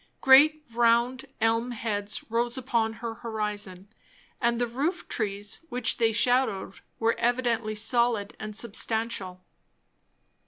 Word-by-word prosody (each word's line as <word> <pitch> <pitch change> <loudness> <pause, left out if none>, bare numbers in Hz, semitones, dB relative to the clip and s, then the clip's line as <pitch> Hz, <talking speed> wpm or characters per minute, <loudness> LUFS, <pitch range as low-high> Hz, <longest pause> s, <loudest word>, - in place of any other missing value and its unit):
Great 300 +3 +6
round 235 +2 +2 0.2
elm 230 +2 +2
heads 210 -3 -3
rose 235 +2 +1
upon 230 -3 0
her 230 0 -6
horizon; 210 -4 -3 0.5
and 235 -1 +1
the 245 - +2
roof 285 +10 -2
trees 205 -2 -3
which 245 -2 +1
they 225 -2 +3
shadowed 230 -4 +1 0.2
were 230 0 +2
evidently 235 -2 0
solid 225 -1 +1
and 215 -1 -6
substantial. 220 -4 -3
230 Hz, 115 wpm, -27 LUFS, 215-245 Hz, 0.5 s, Great